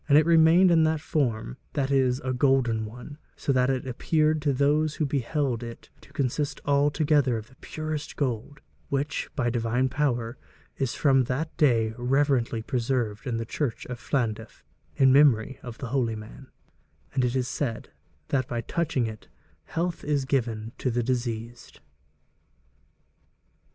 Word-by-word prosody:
And 145 - +7
it 155 - +5
remained 170 +2 +6
in 165 -1 +5
that 155 0 +1
form, 120 - -1 0.2
that 140 -1 -1
is, 130 -2 +2
a 130 -3 -2
golden 125 -4 +2
one, 125 +7 -10 0.2
so 140 - -1
that 125 0 +3
it 130 -1 -1
appeared 155 +4 +1
to 145 -1 +1
those 145 +3 +2
who 155 - 0
beheld 140 -2 -1
it 115 -1 -9
to - - -18
consist 140 0 -1
altogether 145 -2 +2
of 110 +1 -8
the 130 - -20
purest 155 -1 -5
gold, 135 +1 -3 0.3
which, 140 +3 -2
by 120 -5 0
divine 120 +2 0
power, 125 -4 -1 0.4
is 135 -3 -2
from 135 -3 +3
that 150 +6 -3
day 115 -8 +3
reverently 125 -3 +1
preserved 120 -4 -1
in 120 -2 -1
the 115 - -3
church 125 0 -3
of 125 -1 -6
Llandaff 115 -6 -2 0.3
in 135 -1 +5
memory 135 -3 +4
of 120 -1 -8
the 130 -4 -6
holy 120 -4 0
man, 110 +5 -10 0.7
and 130 - +1
it 125 +1 0
is 125 -2 0
said 130 -4 -3 0.4
that 130 -3 0
by 120 -1 -2
touching 150 -2 -1
it 110 -1 -7 0.4
health 170 +1 -3
is 145 -2 0
given 115 -5 -1
to 130 - 0
the 120 0 0
diseased.' 120 -1 -4
130 Hz, 155 wpm, -26 LUFS, 120-145 Hz, 0.7 s, And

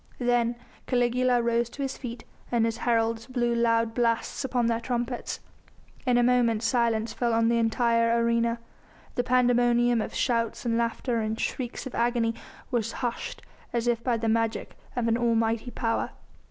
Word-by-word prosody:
Then 240 -1 +1 0.3
Caligula 245 0 +2
rose 235 0 +1
to 280 - -5
his 270 -1 -3
feet 240 -2 -7 0.3
and 235 -2 +3
his 230 0 -1
heralds 230 -1 0
blew 240 -2 0
loud 230 -1 +2
blasts 230 +3 0
upon 250 -2 0
their 230 0 +1
trumpets. 240 +1 -3 0.7
In 245 -1 +4
a 245 - +4
moment 240 -2 +3
silence 230 -2 +1
fell 235 -2 0
on 230 0 +3
the 235 0 +2
entire 230 0 +2
arena; 235 0 +1 0.6
the 245 - 0
pandemonium 245 -1 +3
of - - -5
shouts 230 -2 0
and 230 -1 +1
laughter 235 +1 0
and 220 +1 -2
shrieks 250 0 -3
of 260 - -7
agony 235 -1 +1 0.4
was 230 -3 -1
hushed 240 - -4 0.3
as 235 -1 0
if 235 -1 +1
by 245 -2 +1
the 225 0 -2
magic 225 0 0 0.2
of 245 -2 0
an 230 +1 +2
almighty 230 0 +1
power. 230 -2 -1
235 Hz, 165 wpm, -27 LUFS, 230-245 Hz, 0.7 s, In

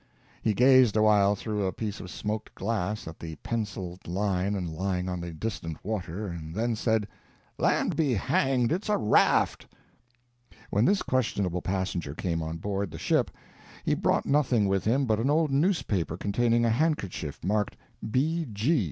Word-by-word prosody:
He 110 - +1
gazed 130 -2 +6
awhile 105 -1 +5
through 105 0 -3
a - - 0
piece 105 +1 -4
of 95 - -8
smoked 105 +3 -4
glass 105 -1 -2
at 80 - -8
the 80 -1 -6
penciled 95 -5 -4
line 95 +2 0 0.2
lying 90 +1 -1
on 90 -1 -3
the 85 0 -5
distant 80 -3 -4
water, 100 -2 -3
and 85 -3 -6
then 115 +2 0
said: 110 -1 +1 0.5
"Land - - +2
be 145 -7 +2
hanged 130 +2 +1
it's 185 +6 -1
a 210 - +3
raft!" 105 - +3 1.0
When 105 +4 +3
this 200 +4 +3
questionable 100 -8 0
passenger 90 -6 -2
came 85 -1 -2
on 80 +1 -4
board 100 +2 -2
the - - -8
ship, - - +1 0.6
he - - +2
brought - - +1
nothing 130 -7 +2
with 95 -1 0
him 130 +5 +2
but 110 -3 +1
an 125 +5 +1
old 155 0 +2
newspaper 135 - +1
containing 115 +4 +2
a 115 - +3
handkerchief 110 - -1
marked 105 +3 0 0.3
"B. 155 +7 0
G. 125 +10 +2
105 Hz, 160 wpm, -28 LUFS, 90-120 Hz, 1.0 s, gazed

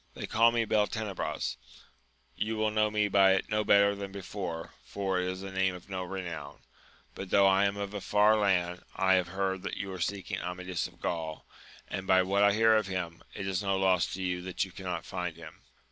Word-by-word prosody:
— - - -34
^They - - -5
call 115 +1 +4
me 115 -1 +1
Beltenebros: 105 - -1 0.8
you 110 +5 -2
will 110 0 +1
know 110 0 +2
me 105 -1 +1
by 95 -1 +5
it 95 - -3
no 105 0 +2
better 100 0 +5
than 100 -1 -6
before, 95 -4 -6
for 95 -2 -2
it 90 - -1
is 95 +1 -4
a 95 - -6
name 95 -1 +1
of 90 +2 -13
no 95 -1 -2
renown; 85 -6 -6 0.5
but, 95 - -7
though 100 +1 +5
I 95 +1 +5
am 100 0 0
of 100 0 -4
a 100 - -4
far 105 +2 +4
land, 90 -4 +1
I 95 -1 +3
have 90 -2 +3
heard 95 +1 -2
that - - -4
you 100 -1 -4
are 95 - -7
seeking 100 +1 -2
Amadis 90 0 -3
of - - -20
Gaul, 80 -2 -3 0.4
and, 95 0 -5
by 95 0 +5
what 100 +2 +1
I 100 0 +5
hear 110 +1 +5
of 105 -2 0
him, 90 -3 -4
it 100 - -4
is 95 0 -1
no 100 -1 0
loss 95 -3 +2
to 95 - -5
you 90 -1 -1
that 90 +1 -2
you 95 - -13
can 95 - -10
not 90 -1 -3
find 90 -3 -4
him. 80 -2 -12
95 Hz, 225 wpm, -30 LUFS, 90-100 Hz, 0.8 s, by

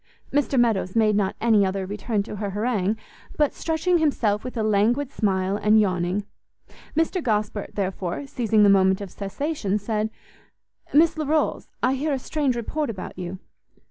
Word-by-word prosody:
Mr 285 -2 +2
Meadows 215 -6 +1
made 215 -2 +4
not 200 -2 0
any 220 -3 +4
other 190 0 -1
return 205 +1 -2
to 210 - -7
her 205 0 -3
harangue, 210 0 0 0.4
but 295 -2 +2
stretching 335 +2 +1
himself 225 -9 +1
with 255 -1 -6
a 220 - 0
languid 225 +6 +2
smile, 190 -4 0
and 210 +1 +4
yawning: 185 0 0 0.7
Mr 330 +3 +1
Gosport, 210 -4 -2
therefore, 190 +3 -3
seizing 225 -5 +2
the - - +7
moment 190 -1 +4
of 200 -3 -7
cessation, 210 +1 -2
said, 215 +1 -1 0.8
"Miss 320 +3 +5
Larolles, 310 +1 0 0.2
I 255 - +3
hear 290 +3 -1
a - - +1
strange 275 -1 -1
report 285 +5 -2
about 195 -5 -6
you." 180 +1 -5
215 Hz, 160 wpm, -24 LUFS, 200-270 Hz, 0.8 s, the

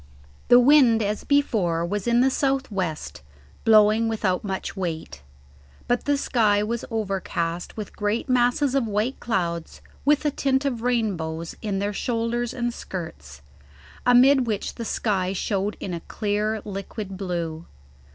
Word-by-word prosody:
The 245 - +8
wind 250 -4 +5
as 210 +1 -2
before 205 - +1
was 205 +4 -3
in 240 +1 +4
the 265 +1 +3
south 270 -2 0
west, 175 - -4 0.4
blowing 215 +1 +5
without 210 -5 0
much 190 -2 -4
weight; 160 - -4 0.7
but 245 0 0
the 285 0 +2
sky 210 -6 +2
was 235 +2 -3
overcast 190 -6 -3
with 215 - -6
great 210 +4 -1
masses 250 +2 +2
of 270 -4 +1
white 215 +5 -1
clouds 170 -8 -2 0.2
with 295 +2 +3
a 295 - +2
tint 270 0 0
of 245 -5 -1
rainbows 180 -10 -1
in 205 -3 -2
their 200 +1 -1
shoulders 235 +2 -1
and 240 -1 -2
skirts, 75 - -8 0.6
amid 250 +1 +5
which 210 -3 -2
the 230 - -6
sky 190 -4 0
showed 200 +1 -2
in 185 - -5
a 170 - -3
clear 210 +3 -2
liquid 195 0 -6
blue. 170 -4 -4
215 Hz, 145 wpm, -24 LUFS, 190-245 Hz, 0.7 s, The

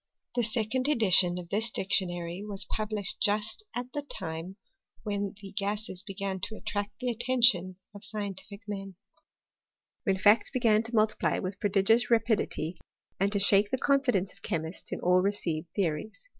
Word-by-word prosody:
The 245 - +2
second 230 +3 0
edition 190 -10 +5
of 175 -1 -7
this 220 +4 0
dic 190 -3 -5
tionary 175 -1 +2
was 205 -2 -5
published 215 -2 -2
just 210 - 0
at 245 +1 -5
the 290 - -2
time 165 - -6 0.5
when 205 -2 -3
the 195 -1 -10
gases 200 -2 -3
began 195 -1 -4
to 220 +4 -5
attract 205 -1 -4
the 250 -1 -2
attention 235 -6 +3 0.2
of 205 - -11
scientific 200 0 -6
men; 195 -2 -6 1.1
when 195 -5 +1
facts 205 +3 +4
began 230 -5 +3
to 230 +1 -5
multiply 215 0 +2
with 185 +1 -4
prodigious 205 +4 +2
rapidity, 220 -7 +1 0.4
and 200 +1 +2
to 205 - 0
shake 200 +1 +4
the 260 - 0
confidence 250 -9 +1
of 200 - -20
chemists 165 -3 -4
in - - -3
all 180 +1 +4
received 175 -5 -1
theo 190 -6 +2
ries. 215 - -8
205 Hz, 160 wpm, -29 LUFS, 190-220 Hz, 1.1 s, edition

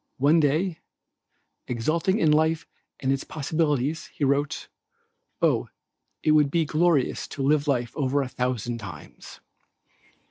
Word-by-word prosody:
One 145 +5 +4
day, 160 +3 +1 0.9
exulting 155 - 0
in 160 -8 +3
life 160 +1 +2 0.4
and 135 - +1
its 135 0 0
possibilities 155 0 -1
he - - -6
writes, 140 +1 0 0.8
"Oh, - - +2 0.6
it 155 - +3
would 150 -2 +5
be 165 +2 +1
glorious 155 -3 +1
to 135 - -5
live 145 +1 +2
life 120 -4 0
over 140 -1 +1
a - - -4
thousand 125 -2 -2
times." 90 -9 -11
145 Hz, 130 wpm, -25 LUFS, 130-160 Hz, 0.9 s, would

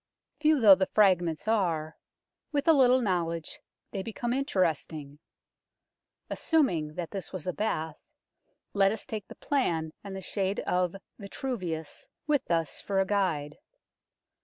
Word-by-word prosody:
Few 305 -1 +4
though 210 -5 +9
the 190 0 +2
fragments 180 -5 +2
are, 165 -8 0 0.6
with 290 +1 -1
a 325 - +8
little 255 -3 +5
knowledge 170 -5 -2 0.3
they 195 - -3
become 230 +4 -3
interesting. 160 - -1 1.1
Assuming 170 - +1
that 175 -2 -4
this 195 -5 -5
was 185 -5 -6
a 180 - -1
bath, 160 -7 -2 0.7
let 195 -1 +4
us 220 - -5
take 220 -6 -5
the - - -11
plan 165 - -1
and 200 -1 -7
the - - -4
shade 195 +1 -1
of 180 0 0 0.2
Vitruvius 185 - -5 0.2
with 295 -4 0
us 165 -2 0
for 195 -1 -1
a 195 - +3
guide. 175 -8 -1
190 Hz, 135 wpm, -29 LUFS, 165-225 Hz, 1.1 s, though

